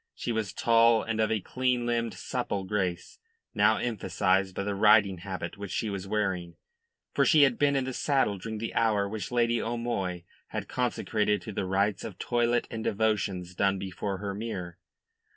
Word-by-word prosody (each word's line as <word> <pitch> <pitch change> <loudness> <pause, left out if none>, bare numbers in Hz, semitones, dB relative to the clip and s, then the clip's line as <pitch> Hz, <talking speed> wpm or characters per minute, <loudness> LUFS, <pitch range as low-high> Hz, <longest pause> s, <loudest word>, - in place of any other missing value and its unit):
She 120 - -3
was 110 -4 -1
tall 115 -1 +4
and 110 -1 -2
of 110 - +1
a 110 -2 0
clean 125 +3 0
limbed, 115 -3 -1
supple 105 -2 -3
grace, 95 -3 -3 0.3
now - - +4
emphasised 95 -4 0
by 100 - -2
the 100 0 -2
riding 100 -2 +5
habit 95 0 -6
which 100 -1 -6
she 110 +3 -2
was 100 -1 -5
wearing 95 -5 -1 0.6
for - - +3
she 155 -5 +6
had 135 -4 +3
been 145 -1 +3
in 135 - +1
the 130 0 -4
saddle 130 -8 +1
during 110 +3 -5
the 115 +2 -4
hour 105 -3 +2
which 105 0 -5
Lady 120 -1 +2
O'Moy 115 -7 -2 0.2
had - - -5
consecrated 110 -4 0
to 110 - -6
the 95 - -2
rites 100 +2 0
of 105 -5 -7
toilet 120 +1 +1
and 110 -1 -4
devotions 100 -5 0
done 100 +1 +1
before 95 +1 -4
her 100 +1 -4
mirror. 95 -5 -5
105 Hz, 180 wpm, -28 LUFS, 95-115 Hz, 0.6 s, she